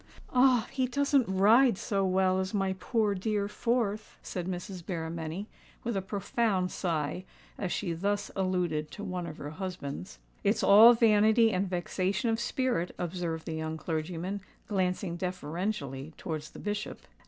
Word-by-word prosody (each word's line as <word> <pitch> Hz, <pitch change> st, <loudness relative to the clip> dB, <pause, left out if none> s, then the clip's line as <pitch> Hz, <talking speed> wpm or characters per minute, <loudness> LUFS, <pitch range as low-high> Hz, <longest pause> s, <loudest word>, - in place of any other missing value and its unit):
"Ah! 250 Hz, -2 st, +5 dB
he 260 Hz, -2 st, 0 dB
doesn't 280 Hz, -2 st, +2 dB
ride 215 Hz, +5 st, +5 dB
so 195 Hz, -1 st, 0 dB
well 185 Hz, 0 st, +2 dB
as 190 Hz, +2 st, -2 dB
my 195 Hz, -1 st, +1 dB
poor 220 Hz, -4 st, +1 dB
dear 200 Hz, +1 st, -1 dB
fourth," 215 Hz, -1 st, -1 dB
said 180 Hz, -1 st, -4 dB
Mrs. 180 Hz, 0 st, -5 dB
Berrymenny, 165 Hz, +1 st, -4 dB, 0.4 s
with 235 Hz, -3 st, -2 dB
a 195 Hz, -, 0 dB
profound 195 Hz, -1 st, 0 dB
sigh, 165 Hz, -1 st, -2 dB, 0.3 s
as 185 Hz, -3 st, -3 dB
she 175 Hz, -5 st, -1 dB
thus 200 Hz, +4 st, -1 dB
alluded 180 Hz, -5 st, 0 dB
to 205 Hz, -, -8 dB
one 180 Hz, -3 st, -3 dB
of 155 Hz, -, -8 dB
her 145 Hz, -, -6 dB
husbands. 150 Hz, -, -6 dB, 0.3 s
"It's -, -, +2 dB
all 225 Hz, +4 st, +9 dB
vanity 220 Hz, 0 st, +5 dB
and 185 Hz, +1 st, 0 dB
vexation 185 Hz, +4 st, 0 dB
of 225 Hz, -, 0 dB
spirit," 240 Hz, -7 st, -1 dB
observed 170 Hz, -2 st, -3 dB
the 160 Hz, -, -4 dB
young 160 Hz, 0 st, -3 dB
clergyman, 170 Hz, +5 st, -3 dB, 0.3 s
glancing 185 Hz, -3 st, -1 dB
deferentially 165 Hz, -5 st, -3 dB
towards 155 Hz, -4 st, -5 dB
the -, -, -12 dB
Bishop. 210 Hz, 0 st, -4 dB
190 Hz, 150 wpm, -30 LUFS, 170-210 Hz, 0.4 s, all